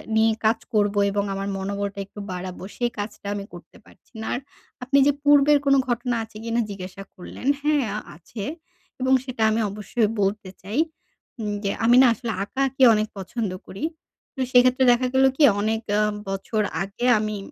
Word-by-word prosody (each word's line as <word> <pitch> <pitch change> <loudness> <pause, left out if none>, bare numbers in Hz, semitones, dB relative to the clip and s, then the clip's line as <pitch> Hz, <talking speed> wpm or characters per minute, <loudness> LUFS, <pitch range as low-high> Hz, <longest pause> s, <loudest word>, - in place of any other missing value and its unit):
নিয়ে 220 0 +4
কাজ 225 +1 +3
করবো 205 -1 +2
এবং 200 0 0
আমার 195 0 -3
মনোবলটা 200 +1 -3
একটু 205 - -12
বাড়াবো 180 0 -6
সেই 240 -1 0
কাজটা 205 0 -6
আমি 200 -1 -5
করতে 175 - -13
পারছি - - -23
না। 220 - -5
আর - - -1 0.4
আপনি 270 +3 +2
যে - - +6
পূর্বের 290 0 +6
কোনো 275 0 +5
ঘটনা 245 0 -1
আছে 220 -1 -12
কিনা 230 +1 0
জিজ্ঞাসা 195 -1 -7
করলেন। 185 +7 -8 0.2
হ্যাঁ 295 -3 +2 0.3
আছে 195 +6 -8 0.6
এবং 260 +1 +3
সেটা 255 -4 -3
আমি 220 +1 +1
অবশ্যই 210 +2 -1
বলতে 200 0 -1
চাই। 205 +8 -3 0.6
উম 210 -2 -2
যে 200 - 0
আমি 240 +2 +6
না 265 - +7
আসলে 230 +1 -4
আঁকাআঁকি 265 +4 0
অনেক 215 0 +1
পছন্দ 195 +2 -3 0.2
করি। 195 - -8 0.5
তো - - -11
সেক্ষেত্রে 255 +1 +5
দেখা 250 +1 +2
গেল 265 0 +5
কি 310 - +4 0.2
অনেক 220 +1 0 0.2
আ - - +3 0.3
বছর 195 +3 -2 0.2
আগে 200 +5 -5
আমি 215 0 -2
220 Hz, 175 wpm, -24 LUFS, 200-250 Hz, 0.6 s, না